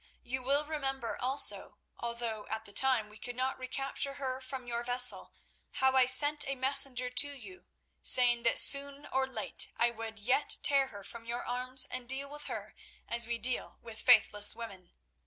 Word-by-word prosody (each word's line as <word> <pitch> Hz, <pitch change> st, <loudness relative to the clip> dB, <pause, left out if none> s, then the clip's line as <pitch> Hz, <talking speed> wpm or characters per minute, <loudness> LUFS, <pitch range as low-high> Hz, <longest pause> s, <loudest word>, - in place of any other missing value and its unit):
You 260 Hz, +2 st, -5 dB
will 280 Hz, +4 st, 0 dB
remember 270 Hz, -5 st, -4 dB
also, 265 Hz, +3 st, +3 dB, 0.2 s
although 235 Hz, -2 st, -6 dB
at 220 Hz, 0 st, -6 dB
the 200 Hz, -, -10 dB
time 255 Hz, -4 st, +1 dB
we 210 Hz, +1 st, -16 dB
could 245 Hz, 0 st, -6 dB
not 260 Hz, +1 st, -3 dB
recapture 275 Hz, +2 st, -5 dB
her 260 Hz, -2 st, -6 dB
from 260 Hz, -1 st, -9 dB
your 235 Hz, -1 st, -5 dB
vessel, 245 Hz, +1 st, -1 dB, 0.4 s
how 265 Hz, 0 st, 0 dB
I 260 Hz, -1 st, +4 dB
sent 290 Hz, +4 st, +5 dB
a 275 Hz, -, -4 dB
messenger 260 Hz, -1 st, +2 dB
to 265 Hz, +3 st, +1 dB
you, 365 Hz, +7 st, -13 dB, 0.3 s
saying 245 Hz, -2 st, +4 dB
that -, -, +1 dB
soon 280 Hz, 0 st, +5 dB
or 265 Hz, -1 st, -2 dB
late 265 Hz, -, -2 dB
I 235 Hz, 0 st, +1 dB
would 225 Hz, -1 st, -9 dB
yet 250 Hz, +7 st, 0 dB
tear 275 Hz, -1 st, +4 dB
her 205 Hz, -5 st, -12 dB
from 230 Hz, +3 st, -11 dB
your 240 Hz, +1 st, -6 dB
arms 255 Hz, +1 st, -1 dB
and 250 Hz, -1 st, -8 dB
deal 275 Hz, +2 st, -1 dB
with 295 Hz, 0 st, -10 dB
her -, -, -7 dB, 0.3 s
as 235 Hz, 0 st, 0 dB
we 235 Hz, 0 st, -3 dB
deal 245 Hz, +2 st, -1 dB
with 225 Hz, -2 st, -9 dB
faithless 215 Hz, -4 st, +4 dB
women. 195 Hz, -6 st, -11 dB
255 Hz, 180 wpm, -30 LUFS, 235-270 Hz, 0.4 s, sent